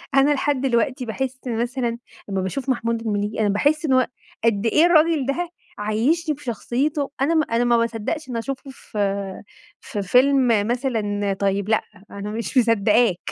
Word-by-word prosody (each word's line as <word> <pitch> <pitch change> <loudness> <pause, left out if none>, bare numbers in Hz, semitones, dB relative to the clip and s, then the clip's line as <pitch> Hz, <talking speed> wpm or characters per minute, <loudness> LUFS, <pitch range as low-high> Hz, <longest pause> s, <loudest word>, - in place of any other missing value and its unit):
أنا 275 +2 +5
لحد 285 -1 0
دلوقتي 255 0 0
باحس 260 +3 -3
مثلًا 240 0 -1 0.3
أمّا 195 -1 -1
باشوف 255 +9 -3
محمود 230 -2 0
المليجي، 210 -1 -2
أنا 210 -2 +2
باحس 290 +10 +1
إن 270 - +2
هو 255 -1 +4 0.4
قد 225 -2 +2
إيه 300 +8 +4
الراجل 325 -4 +4
ده 330 +6 -2 0.3
عيشّني 270 +10 +1
بشخصيته 275 +2 -2
أنا 310 +5 +2
م 315 - +4
أنا 230 +1 +2
ما 240 -1 +3
باصدقش 230 +7 -2
إن - - -5
أنا 230 - -1
شُفته 275 +2 -6
ف 245 - -12 0.8
في 205 - -4
فيلم 255 +6 +4 0.2
مثلًا 215 -5 -1
طيّب، 200 +1 0
لأ 220 - +3 0.3
أنا 200 +1 -6
مش 230 +5 -3
مصدقاك، 230 -3 +4
240 Hz, 160 wpm, -22 LUFS, 220-275 Hz, 0.8 s, أنا